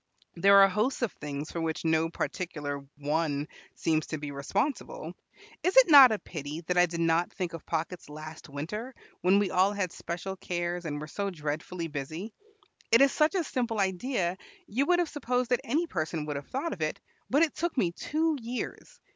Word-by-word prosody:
There 195 +3 +7
are - - +8
hosts 215 +7 0
of 235 - +1
things 145 0 -6
for 170 - -3
which 160 0 -2
no 160 0 +2
particular 150 -6 -4
one 145 0 -1 0.3
seems 155 -1 0
to 155 - -3
be 145 -1 -6
responsible. 230 - -2 0.5
Is 370 +6 +1
it - - +8
not 275 -4 +11
a 215 - +1
pity 155 -3 -6
that 180 +2 -2
I 180 0 +5
did 170 0 -4
not 165 +1 +2
think 180 -3 -4
of 165 - -8
pockets 165 0 -3
last 155 +1 -9
winter, 210 - -5 0.3
when 185 +3 +5
we 200 -2 +1
all 190 +3 +3
had 195 -4 -1
special 180 +3 -5
cares 175 -1 -3
and 145 -2 -3
were 150 - -5
so 200 +6 -3
dreadfully 165 +1 -4
busy? 160 +8 -5 0.6
It 230 +3 +7
is 275 0 +6
such 310 +4 +2
a 365 - +2
simple 240 -6 -2
idea 190 -1 0 0.3
you 265 +7 0
would 355 - +4
have 350 -1 +1
supposed 250 -4 -1
that 245 - +3
any 305 +9 +1
person 160 - -3
would 150 -1 -3
have 140 0 -6
thought 290 +4 -2
of 170 - -9
it, 155 - -1 0.3
but 285 +5 +4
it 320 - +1
took 340 -3 -2
me 180 -8 +2
two 310 - 0
years. 240 +2 -6
180 Hz, 195 wpm, -29 LUFS, 155-245 Hz, 0.6 s, not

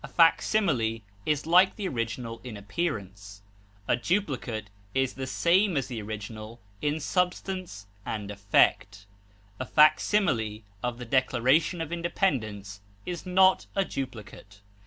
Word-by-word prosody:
A - - -6
facsimile 135 - +2 0.2
is 150 -1 +1
like 180 +3 +5
the 205 -3 -3
original 115 -3 -4
in 120 -5 -7
appearance; 100 - -4 0.4
a - - +3
duplicate 125 - -2 0.2
is 135 -1 +1
the 130 -1 -5
same 175 +5 +2
as 135 - -1
the 120 -3 -4
original 110 +2 -7 0.2
in 150 +1 0
substance 180 - -2 0.2
and 105 -1 -4
effect; 100 0 +2 0.5
a 130 - -2
facsimile 150 - +3 0.2
of 120 -1 -2
the 125 - -7
Declaration 130 +7 +2
of 165 0 -4
Independence 110 - -2 0.2
is 175 0 -5
not 185 +1 +4
a 195 - +2
duplicate. 110 - -7
130 Hz, 125 wpm, -27 LUFS, 110-170 Hz, 0.5 s, like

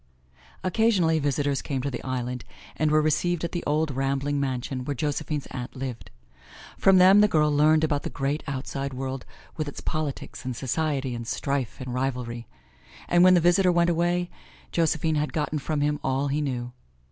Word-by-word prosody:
Occasionally, 185 -5 +2
visitors 140 -1 0
came 135 -2 -3
to 140 - -2
the 125 - -5
island 125 -1 -3 0.3
and 155 - +1
were 155 0 +3
received 170 +2 +1
at 170 - -2
the 175 - -3
old 155 +1 +1
rambling 135 +2 -1
mansion 130 -1 -2
where 145 +2 -3
Josephine's 145 +1 -2
aunt 125 -1 -6
lived. 130 -3 -6 0.7
From 195 -1 +5
them 190 +3 +7
the 210 - +6
girl 150 -5 +2
learned 155 +2 +4
about 145 -2 +1
the - - -4
great, 140 +2 -2
outside 135 0 -4
world 130 0 -4 0.3
with 155 -2 -2
its 145 - -6
politics 155 -4 -4
and 130 -1 -4
society 135 0 -1
and 115 -1 -6
strife 135 -3 -2
and 130 -1 -5
rivalry; 125 -2 -3 0.6
and 175 0 +5
when 185 0 +7
the - - +5
visitor 180 +2 +4
went 170 0 +3
away 175 +1 0 0.4
Josephine 160 -1 +1
had 150 - -3
gotten 155 -2 -1
from 150 +1 -2
him 150 0 +1
all 135 +2 0
he 145 +2 0
knew. 125 -4 -3
145 Hz, 180 wpm, -26 LUFS, 135-160 Hz, 0.7 s, them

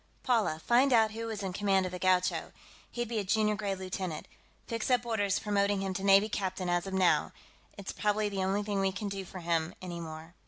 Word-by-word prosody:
"Paula, 225 - +2
find 255 +4 +4
out 220 -2 +5
who 230 +1 -5
was 215 -3 -4
in 190 -2 -3
command 195 -1 +2
of 185 - -4
the 180 - -6
Gaucho; 185 0 +1 0.4
he'd 240 -1 -3
be 225 -1 -2
a - - -1
junior 215 +2 +2
grade 205 -2 -2
lieutenant. 185 -3 -4 0.4
Fix 230 +1 -3
up 245 -1 +2
orders 205 -4 +1
promoting 200 -1 +1
him 195 -1 -2
to 190 +1 -4
navy 200 +1 +6
captain, 190 -3 -2
as 175 +2 0
of 190 - -5
now. 185 -2 +3 0.4
It's 200 -1 -5
probably 210 0 0
the 195 -2 -2
only 195 +2 0
thing 205 -1 -1
we 195 0 +2
can 200 +2 -4
do 195 -1 -4
for 185 0 -9
him, 165 0 -1
anymore. 170 -2 -7
195 Hz, 220 wpm, -30 LUFS, 185-215 Hz, 0.4 s, navy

